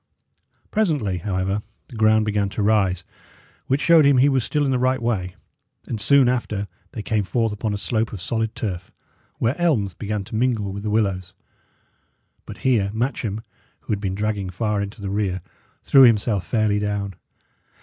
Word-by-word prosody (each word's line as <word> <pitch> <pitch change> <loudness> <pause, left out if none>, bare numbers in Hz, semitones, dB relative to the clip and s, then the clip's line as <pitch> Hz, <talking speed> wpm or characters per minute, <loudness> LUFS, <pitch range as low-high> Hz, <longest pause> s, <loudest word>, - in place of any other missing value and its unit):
Presently, 145 - 0
however, 95 +2 -1 0.3
the 125 - -11
ground 110 0 +4
began 105 -2 0
to 105 +1 -3
rise, 95 -4 +2 0.6
which 135 +3 +1
showed 170 -2 +6
him 140 -2 +5
he 135 +3 +5
was 135 -3 +1
still 150 +3 0
in 135 - +1
the 130 - +1
right 130 +1 +2
way, 100 -7 -2 0.5
and 110 -3 -4
soon 140 +3 +5
after 110 -5 -1 0.3
they 110 - -5
came 110 -1 0
forth 115 +2 0
upon 105 +1 -2
a 105 - -2
slope 110 +2 -1
of 105 - -6
solid 110 +4 -2
turf, 95 -4 -4 0.5
where 115 +4 +1
elms 115 - +2
began 105 +3 -3
to 100 - -8
mingle 110 -4 0
with 100 - -5
the 105 - -3
willows. 95 -4 -1 1.1
But - - -8
here 115 -7 +3
Matcham, 110 -3 -2 0.4
who - - -7
had 100 - -2
been 95 -2 -2
dragging 105 -2 -2
far 105 +2 -1
into 100 +1 -6
the 100 -1 -4
rear, 95 -3 -1 0.4
threw 135 - +6
himself 110 -5 +4
fairly 110 -3 +1
down. 100 -1 -2
105 Hz, 175 wpm, -22 LUFS, 100-120 Hz, 1.1 s, showed